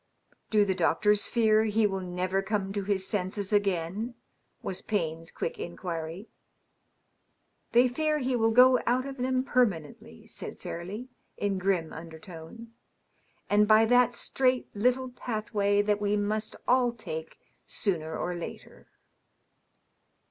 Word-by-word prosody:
" - - -33
Do 210 -2 +4
the 190 - +1
doctors 200 +4 +2
fear 220 -2 +3
he 220 0 +2
will 195 -2 0
never 185 +1 -1
come 195 -1 -2
to 200 -1 -2
his 190 -1 -1
senses 200 +1 -2
again 185 -4 +1
T^ 230 +4 -4 0.5
was 190 0 -4
Payne's 165 -5 -2
quick - - -4
inquiry. 170 +2 -5 0.7
" - - -46
They 245 +2 +6
fear 305 +4 0
he 260 -3 0
will 225 -1 +3
go 250 +2 +6
out 250 +2 +2
of 275 0 -6
them 255 0 0
permanently/' 195 - -1
said - - -8
Fairleigh, 200 +9 -6 0.3
in 200 -2 -1
grim 180 -4 0
unaertone, 165 +7 -10 0.4
" - - -40
and 210 +1 +4
by 215 +1 +6
that 245 +1 +4
strait 255 +1 +1
little 250 +4 +1
pathway 210 -4 0
that 205 0 +1
we 205 0 +1
must 215 +1 -2
all 250 -1 +3
take 160 -8 -7 0.3
sooner 160 -6 -1
or 180 - -2
later." 170 -1 -9
205 Hz, 140 wpm, -28 LUFS, 185-235 Hz, 0.7 s, They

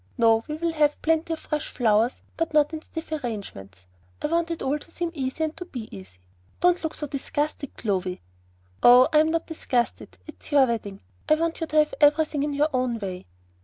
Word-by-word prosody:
No, 225 -1 +4
we 300 - -3
will 335 +1 -1
have 300 -2 +2
plenty 325 +1 +1
of - - -3
fresh 300 0 -3
flowers, 225 0 +1
but 330 -2 -2
not 300 +1 +4
in 315 - -4
stiff 320 0 -8
arrangements. 200 - -6 0.3
I - - -4
want 335 +1 +1
it 335 - -4
all 285 +3 0
to - - -15
seem 340 0 -3
easy 270 +1 -3
and 315 0 -2
to 360 - -6
be 245 -10 -8
easy. 95 -1 -12 0.4
Don't 355 0 +3
look 320 - -3
so 300 - -4
disgusted, 290 +1 -3
Clovy." 190 -4 -2 0.6
"Oh, 250 +3 +8
I'm 310 +1 +5
not 330 0 0
disgusted. 250 -7 -2
It's 310 - -11
your 280 -2 +6
wedding. 215 -5 -4 0.3
I 310 - +6
want 330 +1 -2
you 325 - -1
to 305 - -6
have 300 0 +4
everything 295 0 +4
in 290 0 -1
your 295 +2 +2
own 255 -2 0
way." 185 - -6
295 Hz, 200 wpm, -25 LUFS, 235-320 Hz, 0.6 s, Oh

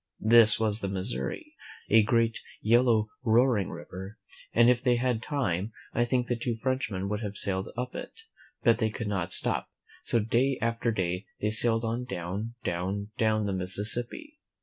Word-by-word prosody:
This 115 -1 +7
was 110 -1 +1
the 100 - -3
Mis 95 +4 -2
souri, 310 -3 -5 0.3
a 110 +1 +6
great, 115 +1 +1 0.2
yellow, 115 -1 +3
roaring 120 -3 +3
river, 95 +4 -8 0.3
and 120 0 +5
if 125 -1 +4
they 125 -2 +3
had 120 -2 0
time, 115 - -2 0.2
I 120 - +2
think 125 0 0
the 120 - -1
two 115 0 -2
Frenchmen 115 -6 -2
would 105 +1 -2
have 105 -2 -5
sailed 95 +1 -2
up 125 +1 -3
it; 450 - -8 0.4
but 115 - +4
they 110 - +1
could 115 +2 -5
not 95 -3 -2
stop. - - +1 0.3
So - - +1
day 120 +4 +1
after 115 +1 0
day 90 -1 -2
they 105 - 0
sailed 115 +1 +1
on 115 +2 -2
down, 100 +2 -5
down, 95 +4 -3
down 110 -1 +2
the 100 - -1
Mississippi. 115 - -2
115 Hz, 170 wpm, -28 LUFS, 100-120 Hz, 0.4 s, This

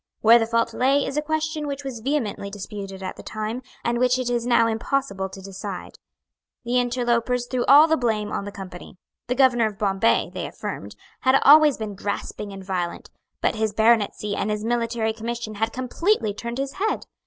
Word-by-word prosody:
Where 230 +2 +7
the 225 - 0
fault 230 0 +1
lay 275 +2 +2
is 275 - -4
a 300 - +1
question 310 0 -2
which 285 0 -4
was 265 -4 -5
vehemently 230 -6 -2
disputed 195 -1 -7
at 185 - -5
the - - -8
time, 215 +3 -4 0.2
and 235 0 +1
which 250 0 +3
it 250 -1 -2
is 240 0 -1
now 240 -2 +4
impossible 225 -3 -1
to 190 0 -11
decide. 195 0 -7 0.7
The 245 +1 +2
interlopers 245 0 0
threw 245 0 -1
all 290 +4 +8
the 320 0 +2
blame 215 -4 -1
on 200 - -3
the 205 - -6
Company. 185 -2 -10 0.3
The 250 - 0
Governor 245 -4 +4
of 210 -2 -7
Bombay, 195 - +1
they - - -4
affirmed, 100 0 -7 0.2
had 260 +1 +4
always 300 0 +7
been 215 -2 -5
grasping 205 +1 -4
and 195 -1 -9
violent; 180 -3 -3 0.3
but - - +2
his 220 -1 -1
baronetcy 220 -2 +2
and 210 - -1
his 210 0 -2
military 230 -1 0
commission 230 0 -5
had 225 +1 +1
completely 255 - 0
turned 235 +3 -5
his 275 +3 -4
head. 435 - 0
230 Hz, 190 wpm, -24 LUFS, 205-255 Hz, 0.7 s, all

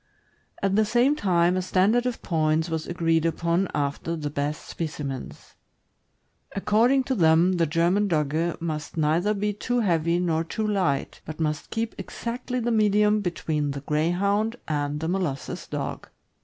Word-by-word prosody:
At 195 0 +2
the 215 - +4
same 240 +6 +3
time, 180 - +2
a 185 - +1
standard 200 +7 +2
of 245 - -4
points 160 0 +1
was 160 -1 -2
agreed 165 -2 +1
upon 170 +3 +1
after 145 +3 -2
the 150 -3 -4
best 145 +1 -3
specimens. 150 -5 -6 1.0
According 230 +7 +3
to 265 - -1
them, 170 -2 +4
the 165 -1 +2
German 175 +6 +2
Dogge 160 0 0
must 155 -1 -4
neither 165 +7 +2
be 210 +1 -1
too 245 +4 -1
heavy 170 -4 +2
nor 165 -2 +1
too 215 +6 -3
light, 185 -10 -1
but 155 +1 -8
must 150 -2 -2
keep 225 0 -2
exactly 250 +1 -4
the 240 0 -1
medium 210 -1 +3
between 155 -5 -2
the 140 0 -4
Greyhound 190 - +1
and 145 -1 -1
Molossus 175 -7 -3
Dog. - - -4
170 Hz, 150 wpm, -25 LUFS, 155-210 Hz, 1.0 s, the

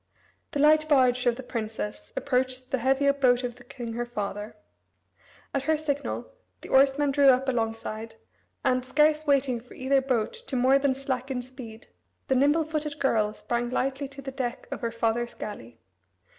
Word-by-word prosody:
The 290 - -1
light 310 +1 +5
barge 255 -3 +4
of 240 - +3
the 260 - -8
princess 220 - -5
approached 255 - -1
the 265 - +1
heavier 270 +3 +3
boat 255 -3 +3
of 245 -1 -4
the 245 - -14
king, 240 -2 -7
her 240 +1 -2
father. 210 -1 -4 1.0
At 275 -1 -1
her 315 0 +3
signal 290 - -3 0.3
the - - -10
oarsmen 275 +1 +4
drew 280 0 +4
up 265 0 +5
alongside, 225 -2 -2 0.5
and, 255 0 +2
scarce 300 +3 +2
waiting 270 -4 +2
for 245 +2 -15
either 270 +1 +2
boat 250 -5 0
to 465 - -7
more 260 +2 +4
than 275 -1 +1
slacken 260 -1 -3
speed, 240 -3 -11 0.4
the 265 - +3
nimble 290 +5 +3
footed 305 -1 -3
girl 215 -7 +1
sprang 240 0 -2
lightly 270 +2 -1
to 275 0 -11
the 270 - -5
deck 250 -3 -4
of - - -5
her 235 -1 -1
father's 230 +1 -1
galley. 120 - -8
260 Hz, 170 wpm, -27 LUFS, 240-280 Hz, 1.0 s, light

